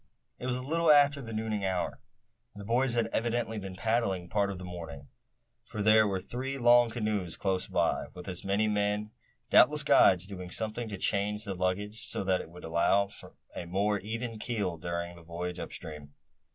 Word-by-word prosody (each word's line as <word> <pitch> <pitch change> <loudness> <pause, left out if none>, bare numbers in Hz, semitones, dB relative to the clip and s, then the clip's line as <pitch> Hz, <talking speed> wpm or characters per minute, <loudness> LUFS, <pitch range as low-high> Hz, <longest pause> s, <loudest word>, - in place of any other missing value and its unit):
It 125 - -4
was 125 -1 0
a 130 - -5
little 165 +3 +3
after 145 -1 +5
the 115 -3 -7
nooning 110 -2 -2
hour. 95 -2 -1 0.6
The 100 0 -8
boys 120 +3 +1
had 115 -1 +2
evidently 115 -1 -1
been 95 -2 -7
paddling 100 -4 0
part 100 0 +1
of 100 - -5
the 90 - -7
morning, 80 -6 -8 0.5
for 105 - -5
there 110 0 +6
were 95 -2 -1
three 130 +7 -4
long 120 -1 +6
canoes 105 -7 -2
close 95 -2 -1
by, - - 0
with 90 - -9
as 90 -2 -5
many 100 +2 +1
men, 105 0 0 0.4
doubtless - - +6
guides, 90 0 +5
doing 90 -3 -7
something 110 +3 -2
to 100 - -5
change 105 +2 0
the 100 -2 -3
luggage, 95 +4 -2
so - - -2
that 95 -1 +1
it - - -11
would 90 +1 -13
allow 95 +5 +2
of - - -12 0.3
a 85 - -5
more 100 +3 +1
even 115 +3 -5
keel 100 -8 -2
during 85 +1 -4
the 85 - -13
voyage 85 +2 -5
up 85 - -6
stream. 75 -2 -8
100 Hz, 190 wpm, -30 LUFS, 90-115 Hz, 0.6 s, there